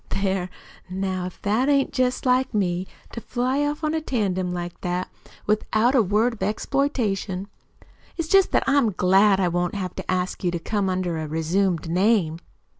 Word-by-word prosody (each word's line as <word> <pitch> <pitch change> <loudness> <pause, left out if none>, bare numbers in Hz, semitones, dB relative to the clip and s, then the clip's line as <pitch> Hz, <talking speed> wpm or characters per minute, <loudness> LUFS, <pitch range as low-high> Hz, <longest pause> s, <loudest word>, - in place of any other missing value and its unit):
"There, 190 -2 -1 0.4
now, 185 -1 -2
if 180 - -11
that 220 +7 +1
ain't 275 -1 +2
jest 255 0 0
like 255 -1 +2
me, 185 -2 0 0.2
to 235 - -6
fly 255 +5 -1
off 295 +2 -2
on 310 0 0
a 320 - 0
tandem 190 -10 -1
like 175 -1 -5
that, 180 0 -2 0.3
without 215 +3 +2
a 260 - +5
word 215 +4 +2
of 225 - -12
exploitation. 210 -4 -1 0.7
It's 330 -2 -2
jest 390 +2 +5
that - - +3
I'm 270 -2 +3
so 210 - -2
glad 195 +2 +4
I 185 - +2
won't 175 +1 -1
have 185 -3 -3
to - - -3
ask 185 +1 -2
you 180 - +2
to 175 - -2
come 195 +3 -1
under 180 -3 -1
a 155 - -4
resumed 165 +3 0
name." 180 -2 +2
195 Hz, 185 wpm, -24 LUFS, 180-245 Hz, 0.7 s, a